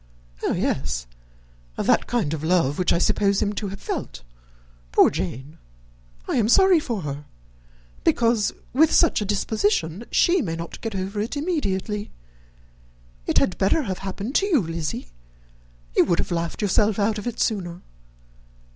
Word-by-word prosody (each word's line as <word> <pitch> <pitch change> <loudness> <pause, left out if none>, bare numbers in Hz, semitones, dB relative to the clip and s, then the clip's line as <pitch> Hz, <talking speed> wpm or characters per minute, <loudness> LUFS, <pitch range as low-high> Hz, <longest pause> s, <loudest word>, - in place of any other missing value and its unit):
"Oh, - - 0
yes! - - -1 0.7
of - - -2
that - - +3
kind 220 -11 0
of 155 -1 -4
love 160 -4 +2
which 180 - +2
I - - +3
suppose 200 +3 +2
him 205 -1 0
to 205 0 -3
have 195 +1 -7
felt. - - -5 0.7
Poor - - +5
Jane! 130 - -5 0.7
I - - 0
am 220 -2 +2
sorry 380 +4 +6
for 235 -9 -3
her, 145 0 -5 0.8
because, 230 -3 +2 0.2
with 315 +5 +5
her 335 - +5
disposition, 205 -2 0
she 355 0 +3
may 165 -8 -3
not 165 0 -7
get 225 -3 -4
over 195 +2 -3
it 230 +7 -3
immediately. 210 - -2 1.2
It - - +1
had 185 - +2
better 200 +11 +2
have 190 -6 -4
happened 195 +5 -5
to 395 - +1
you, 320 - +3
Lizzy; 165 - -4 0.9
you - - +6
would 175 - +1
have - - -2
laughed 170 +4 -2
yourself 205 +1 +2
out 210 +1 +1
of 210 - -6
it 240 -1 -4
sooner. 180 -6 -1
200 Hz, 155 wpm, -23 LUFS, 170-230 Hz, 1.2 s, sorry